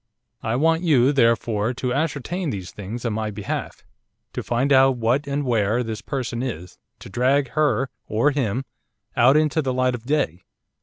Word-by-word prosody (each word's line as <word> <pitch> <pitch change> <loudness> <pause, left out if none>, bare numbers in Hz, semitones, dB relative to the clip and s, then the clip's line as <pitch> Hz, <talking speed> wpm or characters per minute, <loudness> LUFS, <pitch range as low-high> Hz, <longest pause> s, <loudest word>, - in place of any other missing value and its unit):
I 110 +1 -1
want 165 +5 +2
you, 140 -6 +4
therefore, 115 -2 +2
to 125 0 -2
ascertain 160 +4 -2
these 95 -6 -5
things 105 +5 -7
on 115 - 0
my 110 0 -2
behalf; 105 - -5 0.5
to - - -3
find 130 +4 +1
out 135 -1 +5
what, 120 +5 +1
and 140 0 -1
where, 115 0 +1
this 110 -2 -5
person 125 -4 -3
is, 90 -9 -6 0.2
to - - -11
drag 130 +6 +1
her! 135 0 +1 0.2
or 115 +7 +2
him; 135 -2 -1 0.5
out 130 +5 +5
into 155 +1 +2
the 130 -3 -1
light 130 0 +2
of 120 0 -7
day. 140 - 0
125 Hz, 170 wpm, -23 LUFS, 115-140 Hz, 0.5 s, out